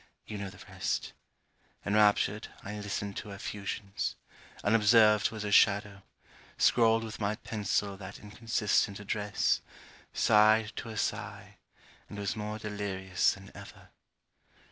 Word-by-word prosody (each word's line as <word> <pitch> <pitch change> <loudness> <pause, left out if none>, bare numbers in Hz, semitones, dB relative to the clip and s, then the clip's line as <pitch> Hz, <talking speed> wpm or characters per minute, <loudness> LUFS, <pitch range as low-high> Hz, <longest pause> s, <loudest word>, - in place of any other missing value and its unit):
You 105 -2 -6
know 100 -1 -4
the - - -13
rest. - - -3 0.7
Enraptured, 105 0 +3 0.2
I 105 +1 -6
listened 100 -1 -4
to 105 - -6
her 100 - -7
effusions; 100 -1 -4 0.5
unobserved, 105 0 +5
was 110 -1 -6
her 105 - -3
shadow; 100 -1 +4 0.6
scrawled 115 -1 +4
with 110 -1 -7
my 105 +1 0
pencil 105 -3 -2
that 95 0 -9
inconsistent 105 -1 0
address; 105 0 0 0.5
sighed 110 +1 +4
to 115 - -5
her 110 - -7
sigh; - - -4 0.5
and 105 - -8
was 100 -1 -2
more 105 0 -4
delirious 100 -3 -1
than 95 0 -13
ever. - - -13
105 Hz, 125 wpm, -30 LUFS, 100-110 Hz, 0.7 s, unobserved